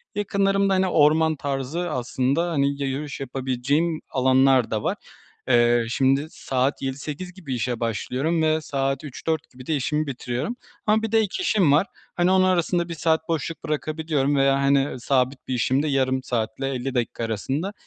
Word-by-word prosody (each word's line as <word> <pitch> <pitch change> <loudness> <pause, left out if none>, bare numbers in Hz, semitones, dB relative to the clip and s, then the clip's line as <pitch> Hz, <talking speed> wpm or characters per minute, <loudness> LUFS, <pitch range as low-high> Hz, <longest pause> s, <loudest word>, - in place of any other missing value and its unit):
Yakınlarımda, 195 -1 +1
hani, 190 0 +2
orman 160 0 +4
tarzı 140 +5 -3
aslında, 135 +6 0
hani, 140 -1 0
ya 135 - 0
yürüyüş 140 +2 -4
yapabileceğim 135 +5 -1
alanlar 130 -1 +3
da 110 -1 -1
var. - - -1 0.5
Eee, 120 -1 +4
şimdi 135 +3 +2
saat 130 -1 -1
7.00-8.00 145 +6 -5
gibi 165 -9 -5
işe 120 0 -2
başlıyorum 130 +8 -1
ve 155 0 +2
saat 135 -2 -2
15.00-16.00 155 +2 -3
gibi 130 0 -13
de 160 - 0
işimi 150 +2 -1
bitiriyorum. 125 - -3 0.3
Ama 215 +1 +3
bir 225 - -2
de 225 - +4
ek 210 -3 -1
işim 200 - +3
var, 155 +7 +4 0.3
hani, 175 +1 +2
onu 185 0 +4
arasında 175 -1 +1
1 170 - -3
saat 160 0 0
boşluk 165 0 -3
bırakabiliyorum 155 -2 -1
veya, 135 0 +4
hani, 140 -1 +2
sabit 130 +1 0
bir 130 - -2
işimde 130 +4 +1
yarım 130 -2 +1
saatle, 120 +2 -2
50 135 0 -3
dakika 120 -1 -1
arasında 135 - -2
140 Hz, 165 wpm, -24 LUFS, 130-165 Hz, 0.5 s, orman